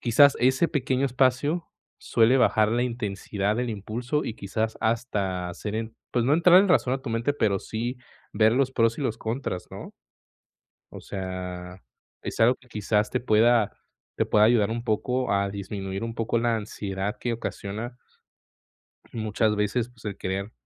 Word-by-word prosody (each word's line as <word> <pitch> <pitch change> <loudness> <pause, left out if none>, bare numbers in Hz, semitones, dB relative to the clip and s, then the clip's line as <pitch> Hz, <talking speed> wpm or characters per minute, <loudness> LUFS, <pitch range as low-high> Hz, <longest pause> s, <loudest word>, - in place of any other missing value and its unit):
quizás 140 +4 +5
ese 130 +6 +3
pequeño 135 -2 0
espacio 130 +6 +1 0.3
suele 115 +3 +3
bajar 110 -4 +4
la 120 +2 +1
intensidad 105 -3 -2
del 125 0 -1
impulso 120 +7 -3
y 110 - -4
quizás 110 +2 -3
hasta 105 -6 -1
hacer 105 +4 -5
en 110 0 -4 0.2
pues, 120 -2 +1
no 135 - +2
entrar 175 +2 +7
en 200 - +2
razón 130 -8 +3
a 135 - -5
tu 125 - -5
mente, 115 +5 0
pero 105 -7 +1
sí 120 +6 -4 0.4
ver 110 +1 +4
los 130 +1 +2
pros 115 -2 +2
y - - -3
los 115 -5 -2
contras, 110 -5 -3
¿no? - - -9 1.0
O - - -8
sea, 90 -1 -6 0.4
es - - -5
algo 115 +3 +6
que 125 - -23
quizás 105 -1 0
te 125 - -1
pueda 115 -1 +3 0.4
te - - +1
pueda 105 0 +4
ayudar 110 -3 +3
un 115 +1 -3
poco 125 +3 -1
a 100 0 +1
disminuir 95 0 -5
un 115 0 -4
poco 115 0 0
la 115 0 +1
ansiedad 100 -2 -4
que 120 - -1
ocasiona 115 +1 -5 1.1
muchas 110 -1 0
veces, 105 +3 0
pues, 120 -3 -21
el 105 -2 -4
querer, 95 +3 -4
115 Hz, 170 wpm, -26 LUFS, 105-125 Hz, 1.1 s, entrar